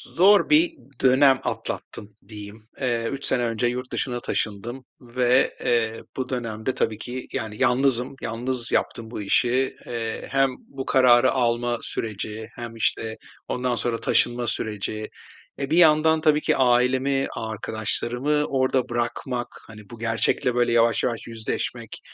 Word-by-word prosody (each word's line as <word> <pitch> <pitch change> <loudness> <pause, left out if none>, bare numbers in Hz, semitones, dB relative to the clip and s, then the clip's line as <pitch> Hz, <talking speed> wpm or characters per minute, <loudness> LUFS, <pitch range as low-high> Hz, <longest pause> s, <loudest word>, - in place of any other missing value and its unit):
zor 195 - +5
bir 325 +2 +4 0.3
dönem 130 +1 +5
atlattım 105 0 -5
diyeyim. 105 0 -10
Eee, 120 -3 0
3 140 0 -2
sene 125 - +2
önce 115 +1 0
yurt 125 +1 -4
dışına 120 -2 -2
taşındım 120 +4 -3 0.2
ve, 125 +1 +2
eee, 115 -2 +1 0.2
bu 130 -1 -3
dönemde 115 -1 -3
tabii 110 -2 0
ki, 125 +3 -6
yani, 105 -1 -4
yalnızım. 130 0 +2
Yalnız 120 +1 -2
yaptım 115 0 -1
bu 110 - -5
işi. 125 +6 +1
Eee, 115 -2 -4
hem 135 0 +3 0.2
bu 135 -1 -7
kararı 130 -1 +5
alma 120 -1 0
süreci 110 0 -5
hem, 120 -1 -7
işte, 110 0 -1 0.3
ondan 125 0 -1
sonra 115 -1 0
taşınma 120 0 +1
süreci, 110 0 -2 0.5
e, 140 0 -3
bir 160 - +2
yandan 160 -1 +5
tabii 155 -1 +3
ki - - +1
ailemi, 130 +2 +2
arkadaşlarımı 120 +6 -2
orada 130 -2 0
bırakmak, 120 +1 -2 0.2
hani, 105 -1 -11
bu 120 - -10
gerçekle, 115 +2 0
böyle, 120 -1 +2
yavaş 115 -1 +3
yavaş 115 -2 -2
yüzleşmek, 115 -1 -4
120 Hz, 140 wpm, -24 LUFS, 115-130 Hz, 0.5 s, zor